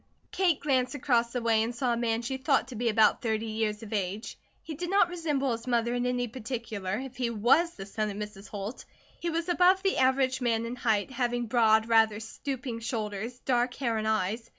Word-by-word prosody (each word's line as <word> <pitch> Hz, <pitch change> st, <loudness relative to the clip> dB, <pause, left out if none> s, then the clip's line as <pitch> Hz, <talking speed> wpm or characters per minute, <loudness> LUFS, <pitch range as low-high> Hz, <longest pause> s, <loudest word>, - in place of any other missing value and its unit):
Kate 355 Hz, -6 st, +2 dB
glanced 260 Hz, -2 st, +1 dB
across 240 Hz, -4 st, +1 dB
the 245 Hz, -1 st, -3 dB
way 225 Hz, -1 st, +3 dB
and 230 Hz, +2 st, -2 dB
saw 245 Hz, 0 st, 0 dB
a -, -, +1 dB
man 230 Hz, 0 st, -1 dB
she 265 Hz, +3 st, -3 dB
thought 265 Hz, -1 st, +1 dB
to 255 Hz, -, -7 dB
be 235 Hz, +1 st, 0 dB
about 215 Hz, -1 st, +4 dB
thirty 220 Hz, -2 st, -1 dB
years 215 Hz, -1 st, -2 dB
of 220 Hz, 0 st, -8 dB
age. 200 Hz, +2 st, -3 dB, 0.3 s
He 320 Hz, -, -6 dB
did 345 Hz, +3 st, -4 dB
not 390 Hz, -2 st, +4 dB
resemble 300 Hz, -7 st, -1 dB
his 230 Hz, +1 st, -4 dB
mother 235 Hz, -1 st, +1 dB
in 245 Hz, 0 st, 0 dB
any 245 Hz, 0 st, 0 dB
particular, 220 Hz, -5 st, -4 dB
if 260 Hz, -2 st, -9 dB
he 245 Hz, -2 st, 0 dB
was 250 Hz, +10 st, +3 dB
the 195 Hz, -, -7 dB
son 215 Hz, +2 st, -2 dB
of 200 Hz, -, -6 dB
Mrs. 210 Hz, -1 st, -7 dB
Holt. 205 Hz, +4 st, -6 dB, 0.4 s
He 345 Hz, -, -2 dB
was 335 Hz, +1 st, -2 dB
above 365 Hz, +2 st, +4 dB
the 390 Hz, -, +1 dB
average 260 Hz, 0 st, +2 dB
man 230 Hz, -2 st, +1 dB
in 235 Hz, +2 st, -4 dB
height, 220 Hz, -2 st, 0 dB
having 245 Hz, -1 st, -1 dB
broad, 220 Hz, -1 st, +3 dB
rather 220 Hz, -2 st, +4 dB
stooping 250 Hz, +1 st, -5 dB
shoulders, 225 Hz, 0 st, -4 dB
dark 245 Hz, -1 st, +1 dB
hair 235 Hz, -4 st, -1 dB
and 215 Hz, -, -2 dB
eyes. 220 Hz, +2 st, -1 dB
235 Hz, 215 wpm, -28 LUFS, 220-260 Hz, 0.4 s, about